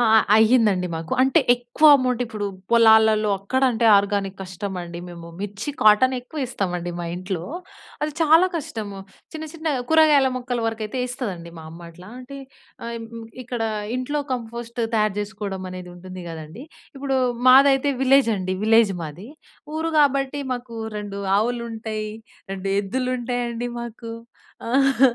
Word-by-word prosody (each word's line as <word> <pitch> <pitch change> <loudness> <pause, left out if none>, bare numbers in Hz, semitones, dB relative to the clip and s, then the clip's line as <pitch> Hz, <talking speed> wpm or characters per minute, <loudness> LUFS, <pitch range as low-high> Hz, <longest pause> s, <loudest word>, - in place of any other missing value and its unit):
అ! - - +4
అ! 220 - +8 0.2
అయ్యిందండి 220 -5 +4
మాకు. 160 0 -5
అంటే, 265 0 +4
ఎక్కువ 245 +5 -3
అమౌంట్ 250 -2 0
ఇప్పుడు 215 -3 -4 0.2
పొలాలలో 220 -2 +5
అక్కడ 200 +7 -1
అంటే 230 -1 +1
ఆర్గానిక్ 200 -1 -2
కష్టమండి. 185 -2 -6
మేము 170 -1 -10
మిర్చి, 205 +6 -4
కాటన్ 215 +5 +5
ఎక్కువ 255 +5 -10
ఇస్తామండి 180 -7 -3
మా - - -4
ఇంట్లో. 185 -1 -4 0.6
అది 300 - -3
చాలా 325 +3 +6
కష్టం, 225 -8 -5 0.4
చిన్న 315 0 -6
చిన్న 330 -1 -9 0.2
కూరగాయల 305 -4 +5
మొక్కల 245 -1 -3
వరకైతే 225 +2 -3
ఇస్తదండి, 195 -10 -5
మా 160 - -10
అమ్మ 165 +2 -12
అట్లా. 180 +3 -14
అంటే 275 +2 -10 0.5
ఆహ్, 235 0 -4
హ్మ్, 230 0 -8 0.2
ఇక్కడ 240 -2 -4 0.3
ఇంట్లో 290 +4 -2
కంపోస్ట్ 235 0 -5
తయారు 215 -2 +2
చేసుకోవడం 205 -2 -5
అనేది 180 -1 -8
ఉంటుంది 185 +1 -9
కదండీ! 160 - -9 0.3
ఇప్పుడు, 270 -1 -1 0.3
మాదైతే 275 +2 +6
విలేజ్ 265 -2 +4
అండి, 185 -1 -2
విలేజ్ 225 -2 +5
మాది. 165 +7 -8 0.5
ఊరు 325 +1 -1
కాబట్టి 275 0 +1
మాకు 245 -1 -9 0.2
రెండు 200 -1 -6 0.2
ఆవులు 235 +2 -1
ఉంటాయి, 220 -1 -4 0.4
రెండు 195 0 -4
ఎద్దులుంటాయండి, 245 +1 -2
మాకు. 235 0 -8 0.6
ఆహ్, 270 +1 +2
225 Hz, 140 wpm, -23 LUFS, 195-255 Hz, 0.6 s, అ